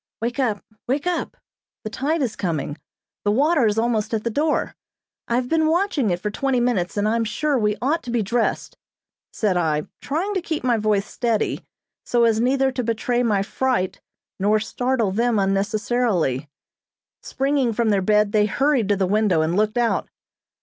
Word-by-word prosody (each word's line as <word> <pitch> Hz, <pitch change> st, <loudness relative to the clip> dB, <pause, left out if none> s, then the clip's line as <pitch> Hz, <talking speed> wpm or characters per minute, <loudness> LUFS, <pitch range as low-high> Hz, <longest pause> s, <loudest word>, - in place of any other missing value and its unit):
"Wake 240 Hz, +4 st, -3 dB
up! 220 Hz, -6 st, 0 dB, 0.2 s
Wake 275 Hz, +5 st, -1 dB
up! 360 Hz, -1 st, -2 dB, 0.5 s
The 215 Hz, -, -5 dB
tide 290 Hz, +6 st, 0 dB
is 230 Hz, -4 st, -2 dB
coming, 155 Hz, -5 st, -3 dB, 0.4 s
the 205 Hz, -, +1 dB
water 275 Hz, +3 st, +3 dB
is 210 Hz, 0 st, 0 dB
almost 225 Hz, -1 st, 0 dB
at 215 Hz, -, -3 dB
the 235 Hz, -, -1 dB
door! 300 Hz, +6 st, 0 dB, 0.5 s
I 235 Hz, -, 0 dB
have 245 Hz, 0 st, 0 dB
been 315 Hz, +2 st, +2 dB
watching 325 Hz, -, +1 dB
it 175 Hz, -1 st, 0 dB
for 210 Hz, +3 st, -3 dB
twenty 270 Hz, +3 st, 0 dB
minutes, 210 Hz, -8 st, 0 dB
and 205 Hz, +1 st, +1 dB
I'm 230 Hz, +1 st, +1 dB
sure 285 Hz, +7 st, -1 dB
we 210 Hz, -4 st, +1 dB
ought 310 Hz, +5 st, +1 dB
to 245 Hz, -, -9 dB
be 235 Hz, -2 st, 0 dB
dressed," 235 Hz, +4 st, -1 dB, 0.5 s
said 200 Hz, -5 st, 0 dB
I, 155 Hz, -3 st, +1 dB, 0.2 s
trying 350 Hz, +9 st, -2 dB
to 380 Hz, -, -1 dB
keep 320 Hz, -4 st, -3 dB
my 245 Hz, -2 st, +2 dB
voice 210 Hz, -2 st, +1 dB
steady 230 Hz, -2 st, -1 dB, 0.4 s
so 240 Hz, -1 st, +2 dB
as 225 Hz, -1 st, +3 dB
neither 265 Hz, +2 st, +2 dB
to 255 Hz, -1 st, -3 dB
betray 235 Hz, +2 st, 0 dB
my 210 Hz, -5 st, +1 dB
fright 245 Hz, -3 st, -1 dB, 0.4 s
nor 210 Hz, +3 st, +3 dB
startle 235 Hz, -1 st, -1 dB
them 230 Hz, +3 st, +1 dB
unnecessarily. 195 Hz, -, 0 dB, 0.7 s
Springing 270 Hz, -2 st, 0 dB
from 230 Hz, 0 st, 0 dB
their 200 Hz, -2 st, +2 dB
bed 210 Hz, +1 st, +3 dB
they 210 Hz, -1 st, +3 dB
hurried 270 Hz, -2 st, +1 dB
to 205 Hz, -, +4 dB
the 195 Hz, -1 st, +1 dB
window 195 Hz, -4 st, +2 dB
and 165 Hz, +2 st, 0 dB
looked 215 Hz, +2 st, +1 dB
out. 235 Hz, -1 st, +1 dB
230 Hz, 180 wpm, -22 LUFS, 205-260 Hz, 0.7 s, to